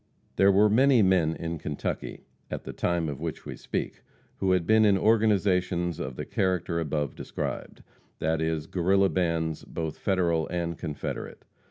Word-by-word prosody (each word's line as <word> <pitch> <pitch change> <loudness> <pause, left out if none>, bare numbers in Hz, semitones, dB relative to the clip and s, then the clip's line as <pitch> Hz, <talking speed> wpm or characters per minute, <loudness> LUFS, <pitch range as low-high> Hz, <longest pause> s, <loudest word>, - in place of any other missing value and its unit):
There 95 +1 +5
were 100 +2 +5
many 125 +2 +5
men 90 -4 +3
in 85 -1 -4
Kentucky 75 -2 -4 0.3
at - - -5
the - - -7
time 85 -2 0
of 70 -3 -5
which - - -5
we - - -6
speak - - -4 0.4
who 95 -1 +2
had 90 -2 +1
been 110 +2 +5
in 100 -2 +5
organizations 95 -5 +2
of 65 -1 -4
the - - -5
character 90 -3 0
above 75 -3 -2
described - - -5 0.3
that 80 0 0
is, 80 -2 -1
Guerrilla 95 +3 +2
bands, 85 -3 -1
both 80 -2 -5
Federal 85 -4 +1
and 85 -1 -2
Confederate. 75 -2 -6
85 Hz, 160 wpm, -27 LUFS, 80-95 Hz, 0.4 s, There